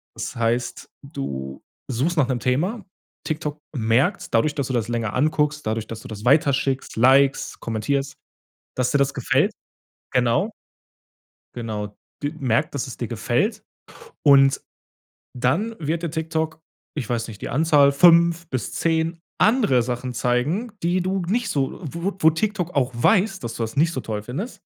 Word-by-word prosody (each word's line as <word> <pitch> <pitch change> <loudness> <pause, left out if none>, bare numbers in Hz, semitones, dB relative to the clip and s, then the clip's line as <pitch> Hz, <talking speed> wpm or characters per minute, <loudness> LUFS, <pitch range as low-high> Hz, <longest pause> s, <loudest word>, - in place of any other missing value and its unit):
Das - - -5
heißt, 120 +1 -1
du 65 -1 -6 0.3
suchst 140 +9 0
nach 140 -4 +4
'nem 125 -2 0
Thema. 175 - -1 0.4
TikTok 150 -1 -3 0.2
merkt's 125 - +1
dadurch, 145 +6 +2
dass 140 -3 -1
du 130 - -3
das 115 -2 0
länger 115 -3 -2
anguckst, 150 +1 +1
dadurch, 110 0 -2
dass 115 -1 -7
du - - -10
das 105 -1 -8
weiterschickst, 135 0 +2
likest, 135 +3 +3
kommentierst, 135 +5 -2 0.6
dass 125 -1 +1
dir 140 - +2
das 140 0 +2
gefällt. 135 - +2 0.6
Genau. 125 - +2 1.0
Genau. 105 -3 -5 0.2
d 145 +2 -2
merkt, 130 +3 0
dass 140 - -2
es 130 - -8
dir 120 - -3
gefällt 120 - -1 0.6
und 135 -1 +6 0.8
dann 170 - 0
wird 160 +2 -2
dir 170 - -1
TikTok, 160 0 -3 0.3
ich 135 -7 -3
weiß 115 -1 -1
nicht, 105 -3 -10
die - - -4
Anzahl 145 0 +4
5 170 +2 +5
bis 130 -2 -3
10 165 0 0 0.2
andere 210 - +4
Sachen 125 +1 -3
zeigen, 140 - 0
die 175 +2 +2
du 190 +1 -1
nicht 230 +1 0
so 135 -5 -1
wo 170 +6 -3
wo 160 - +6
TikTok 180 0 -1
auch 135 -2 +2
weiß, 190 - +3
dass 120 -1 -5
du - - -5
das 110 0 -5
nicht 160 +4 +3
so 130 - -3
toll 105 -3 -4
findest. 145 - -6
140 Hz, 160 wpm, -23 LUFS, 120-165 Hz, 1.0 s, und